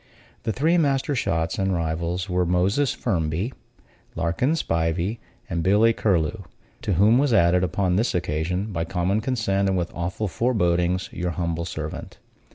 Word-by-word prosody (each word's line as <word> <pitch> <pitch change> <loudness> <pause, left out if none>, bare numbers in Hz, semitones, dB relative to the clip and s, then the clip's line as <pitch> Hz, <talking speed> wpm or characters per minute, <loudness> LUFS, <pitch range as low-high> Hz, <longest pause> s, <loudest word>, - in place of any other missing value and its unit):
The 110 - +1
three 160 +9 +2
master 140 -2 +1
shots 80 -10 -1
and 95 -1 +1
rivals 85 +3 -2
were 90 -1 +1
Moses 95 +10 +2
Firmby, 90 +2 -1 0.6
Larkin 85 - +1
Spivey 85 - -1 0.3
and 85 -5 -2
Billy 105 +6 +4
Curlew; 100 -1 0 0.4
to 100 - -1
whom 105 +8 +5
was 140 -3 +2
added, 90 -2 +4
upon 90 +1 +1
this 115 0 +1
occasion, 90 +5 -2
by 80 -1 -1
common 90 +5 0
consent 105 -6 0
and 95 - +1
with 85 -1 -2
awful 90 +5 -3
forebodings, 90 -5 +1
your 90 0 -3
humble 85 -1 -2
servant. 80 -3 -6
90 Hz, 150 wpm, -24 LUFS, 85-110 Hz, 0.6 s, whom